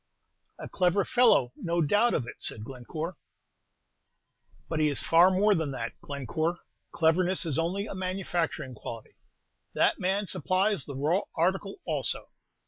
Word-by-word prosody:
"A - - -7
clever 185 +1 +1
fellow, 230 - +4
no 170 0 -2
doubt 205 +10 +3
of 125 - -1
it," - - -9
said 105 - +1
Glencore. 150 +8 -6 1.5
"But 160 - -2
he 155 - +3
is 145 - +1
far 170 +3 +6
more 200 +3 +3
than 160 -5 -1
that, 115 -3 -4
Glencore. 145 +5 -3 0.3
Cleverness 175 +3 +2
is 160 -2 0
only 185 +5 -1
a - - -6
manufacturing 185 -7 -3
quality, 115 0 -9 0.6
that - - +2
man 195 +3 0
supplies 185 0 0
the 140 - -7
raw 155 +8 +1
article 190 - -1
also. - - 0
170 Hz, 140 wpm, -28 LUFS, 145-190 Hz, 1.5 s, far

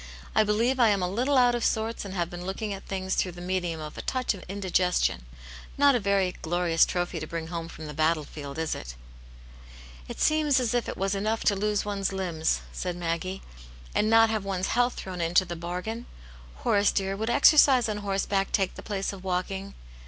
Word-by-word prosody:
I 215 - +5
believe 230 +5 +1
I 235 -2 +6
am 200 -3 +1
a - - +1
little 250 +9 +1
out 245 -1 +5
of 240 -1 -1
sorts, 220 +1 0
and 195 -1 -6
have 175 -2 0
been 175 0 -8
looking 195 +3 -3
at 195 - -9
things 190 -1 -2
through 180 - 0
the 175 - -11
medium 180 -2 -2
of 150 -1 -7
a - - -3
touch 255 -3 -1
of 195 - -10
indigestion. 180 - 0 0.5
Not 285 0 +6
a 245 - +2
very 200 -3 +1
glorious 170 0 +2
trophy 175 -1 -2
to 155 - -6
bring 165 0 -5
home 165 -1 -4
from 160 -1 -9
the 150 - -7
battle 155 +1 +1
field, 140 -1 -8
is 160 -1 -1
it?" - - -7 0.6
" - - -18
It - - -7
seems 305 -3 +3
as 245 -3 0
if 245 -2 0
it - - -5
was 195 +1 0
enough 215 +3 -1
to 205 - +3
lose 210 +1 0
one's 200 -2 -1
limbs," 175 -5 -1
said 180 -1 -4
Maggie, 175 +2 -3 0.5
and 215 - +2
not 225 0 +6
have 215 -2 -1
one's 190 -1 -2
health 245 +1 +2
thrown 185 -2 -6
into 175 +3 +3
rhe 175 -2 -6
bargain. 180 +8 -5 0.6
Horace, 205 0 +3
dear, 195 -1 -1
would 220 +3 -2
exercise 270 -1 +6
oa 210 -1 -2
horse 200 -1 -1
back 195 -1 0
take 195 -3 +1
the - - -9
place 200 -1 -3
of 190 -1 -10
walking 190 +2 -3
195 Hz, 215 wpm, -27 LUFS, 175-215 Hz, 0.6 s, I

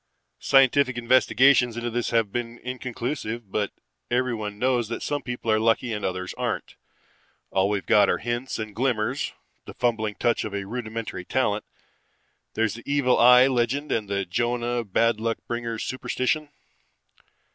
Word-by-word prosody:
Scientific 135 -1 +4
investigations 125 0 +4
into 120 0 -3
this 120 0 -1
have 115 -4 +1
been 120 0 -4
inconclusive, 120 -3 -4
but 105 -1 -1 0.4
everyone 115 -5 -1
knows 125 -1 +1
that 115 +1 -5
some 145 0 -2
people 120 -2 -3
are 110 - +3
lucky 115 +1 +1
and 105 - -4
others 90 0 -3
aren't. - - -3 0.8
All 95 +1 +2
we've 105 -2 -1
got 105 - +5
are - - +2
hints 120 +2 -3
and 110 -1 -5
glimmers, 125 +1 0 0.3
the - - -10
fumbling 110 -4 0
touch 120 - +1
of 105 -2 -5
a 100 -1 -3
rudimentary 115 -4 -5
talent. 105 0 0 0.9
There's 110 -2 +1
the 120 +4 -7
evil 140 -3 +3
eye 125 +1 +8
legend 135 +3 0
and 105 -3 -1
the 100 -1 -1
Jonah, 120 +5 -1
bad 115 +2 +1
luck 115 0 -1
bringers. 115 -1 -3
Superstition? 130 +3 -2
120 Hz, 150 wpm, -25 LUFS, 110-125 Hz, 0.9 s, eye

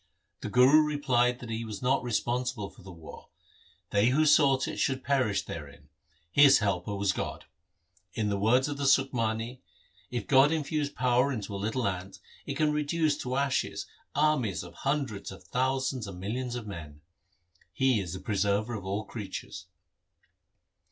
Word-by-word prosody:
The - - -5
Guru 130 +7 +6
replied 130 -5 +1
that 120 -2 -7
he 115 +1 -3
was 110 0 -7
not 130 +2 +2
responsible 120 -2 -2
for - - -18
the 95 0 -11
war; 80 -2 -12 0.6
they 100 +2 +3
who 145 +5 +3
sought 140 -3 +4
it - - -5
should 130 -1 0
perish 125 -9 +1
therein. 75 -2 -9 0.4
His 140 +2 +7
helper 100 -1 -1
was 100 -1 +1
God. - - -5 0.7
In 110 -2 0
the 100 -1 -1
words 125 +6 +3
of 145 -1 -4
the 140 -1 0
Sukhmani: 120 -3 +1 0.2
— - - -33
If 120 -4 -3
God 135 +2 +5
infuse 150 -2 -1
power 125 0 +2
into 105 -6 -4
a - - -3
little 110 +2 -1
ant, 95 0 -4 0.3
It - - -3
can 150 -1 +2
reduce 150 0 +1
to 125 0 -3
ashes 140 -1 -1 0.3
armies 145 - +1
of 90 - -11
hundreds 135 -10 -2
of 95 - -12
thousands 130 -2 -1
and 95 -2 -8
millions 120 +6 -3
of 120 -3 -5
men. 75 -7 -9 0.7
He 130 +2 +2
is 90 -4 -5
the 95 - -5
Preserver 105 +3 0
of 105 -3 -5
all 100 +3 -2
creatures. 105 -4 -7
120 Hz, 165 wpm, -29 LUFS, 100-135 Hz, 0.7 s, His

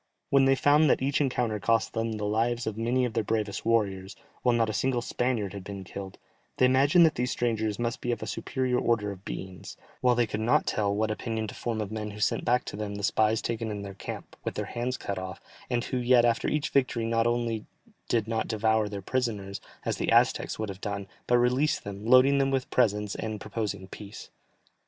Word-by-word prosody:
When 135 -1 +5
they 135 0 +5
found 145 +2 +4
that 130 - +2
each 140 +2 +1
encounter 125 -6 0
cost 115 +2 +1
them 115 0 -1
the 105 -1 -3
lives 115 +3 0
of 110 - -2
many 120 +3 +1
of 120 - -3
their 115 -1 0
bravest 105 -1 -2
warriors, 100 -4 0 0.3
while 125 -1 +3
not 115 -1 +2
a 110 - -2
single 120 +4 0
Spaniard 120 -6 -1
had 100 -2 -7
been 100 0 -7
killed, 95 +1 -8 0.4
they 130 - +5
imagined 140 +7 +5
that 160 - +3
these 125 +1 -1
strangers 110 -4 -1
must 120 0 -2
be 120 - -1
of 120 - -3
a - - -3
superior 130 -2 -1
order 105 -3 +1
of 95 -1 -10
beings, 95 -3 -7 0.2
while 125 -1 +3
they 120 0 +3
could 105 -1 -4
not 110 +3 +3
tell 100 -2 0
what 110 +2 0
opinion 110 0 -3
to - - -8
form 115 -2 -3
of 105 -1 -4
men 110 -1 -4
who 105 0 -9
sent 100 - +1
back 125 +1 +2
to - - -6
them 105 -1 -4
the 100 - -6
spies 110 +2 +2
taken 115 -1 -2
in 105 -1 -4
their 100 -1 -7
camp, 95 - -8
with - - -3
their - - -2
hands 125 +2 -3
cut 100 -2 -4
off, 95 0 -6 0.3
and 120 -2 0
who 130 - -2
yet 125 -1 +4
after 115 -1 +1
each 150 -1 0
victory 125 -4 +1
not 115 0 +2
only 120 -2 -1 0.4
did 115 -3 +1
not 110 -1 -1
devour 110 -1 +1
their 100 -2 -6
prisoners, 105 -6 -2 0.2
as - - -1
the - - -1
Aztecs - - +3
would 110 -1 -3
have 95 0 -8
done, 100 -1 -3 0.2
but 120 - +4
released 125 +5 +2
them, 100 +2 -7
loading 130 +3 +6
them 135 0 +2
with 135 -1 -1
presents 105 -4 +2
and 110 -1 -4
proposing 100 -3 -4
peace. 100 +1 -10
115 Hz, 225 wpm, -28 LUFS, 105-125 Hz, 0.4 s, loading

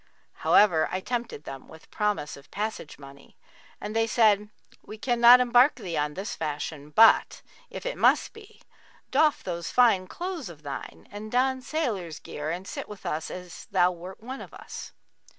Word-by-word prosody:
However, 175 -7 +4
I 185 - -1
tempted 235 - -4
them 135 -3 -9
with 160 0 -16
promise 210 -8 -1
of 140 0 -16
passage 210 -6 -5
money 140 0 -15 0.4
and 210 +1 -6
they 225 0 +2
said, 210 -2 +3 0.3
'We 215 - -10
cannot 240 +1 +6
embark 250 +3 +5
thee 170 -3 -6
on 150 0 -1
this 200 +5 -5
fashion;[FN#42] 150 -1 -5
but, 225 0 +5 0.3
if - - -8
it - - -4
must - - +3
be, 435 -2 -16 0.5
doff 310 -2 +3
those 170 -2 -4
fine 220 -7 +4
clothes 345 - -5
of 155 -3 -13
thine 140 -1 -8
and 210 +1 -8
don 260 +1 +1
sailor's 215 - -3
gear 150 +1 -6
and 180 +4 -4
sit - - -6
with 210 -2 -11
us 155 +1 -3
as 180 -2 -9
thou 180 -2 +3
wert 180 +4 -10
one 260 +3 -6
of - - -11
us.' - - -9
205 Hz, 170 wpm, -27 LUFS, 160-240 Hz, 0.5 s, cannot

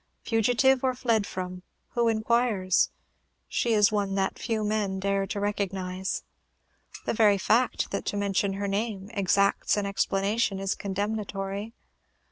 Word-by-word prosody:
Fugitive, 245 +4 +3
or 260 -1 +1
fled 230 -5 +1
from, 180 0 -5 0.3
who 235 -1 +1
inquires? 220 -4 +2 0.6
she 235 - 0
is 210 0 +5
one 200 -2 0
that 195 -1 -1
few 220 -2 -1
men 210 -2 -1
dare 195 0 0
to 205 - -3
recognize. 190 -2 -2 0.8
The - - 0
very 215 -3 +4
fact 235 +6 +1
that 200 - -2
to 205 - -2
mention 200 -1 0
her 200 +1 -3
name 200 0 -2
exacts 200 0 +2
an 205 - 0
explanation, 200 +1 0
is 195 0 -1
condemnatory. 200 +1 -3
200 Hz, 135 wpm, -27 LUFS, 195-220 Hz, 0.8 s, is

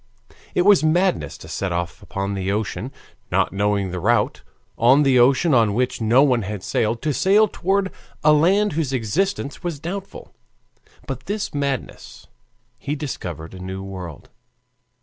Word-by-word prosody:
It 180 - +3
was 200 -3 +5
madness 155 - +1
to - - -12
set 95 -2 -3
off 85 0 -3
upon 100 +1 -4
the 95 0 -2
ocean, 110 +4 -3 0.4
not - - +1
knowing 100 -1 0
the 90 - -4
route, 115 +7 +1 0.3
on 130 +5 +5
the 135 -3 +4
ocean 135 +6 +4
on 110 -5 +3
which 125 0 -1
no 120 +5 +5
one 125 -5 +3
had 100 -1 -5
sailed, 115 +1 -1
to 150 -1 0
sail 200 - +4
toward 195 0 0 0.3
a 150 0 +6
land 190 +7 +3
whose 150 -4 -1
existence 140 - -1
was 170 -5 -3
doubtful. 190 +5 -7 0.7
By 135 - -4
this 205 +1 -3
madness 140 -3 -4 0.5
he 145 - -3
discovered 90 - -6
a 95 - -9
new 95 +1 -6
world. 90 -6 -8
125 Hz, 155 wpm, -22 LUFS, 100-160 Hz, 0.7 s, a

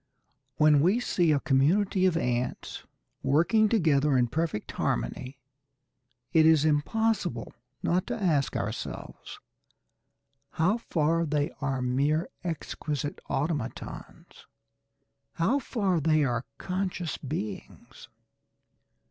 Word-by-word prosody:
When 150 -1 +5
we 190 +9 +3
see 175 -9 +1
a 145 - +3
community 185 +8 +2
of 170 -3 +1
ants 125 -5 -3 0.4
working 170 +11 +3
together 150 - +3
in 120 -1 +2
perfect 155 -5 -2
harmony, 130 +1 -3 1.0
it 160 - +6
is 160 -1 +5
impossible 165 - 0 0.3
not 180 +1 +1
to 240 -2 -3
ask 155 -8 +1
ourselves - - -6 1.1
how 185 +8 +2
far 165 -4 +1
they 150 +1 0
are 135 -3 -1
mere 145 +6 +1
exquisite 150 -3 -4
automatons; 145 -4 -5 0.9
how 230 +12 +1
far 200 -10 0
they 155 0 +3
are 120 -2 -1
conscious 185 -3 -3
beings. 125 - -7
155 Hz, 100 wpm, -28 LUFS, 140-180 Hz, 1.1 s, it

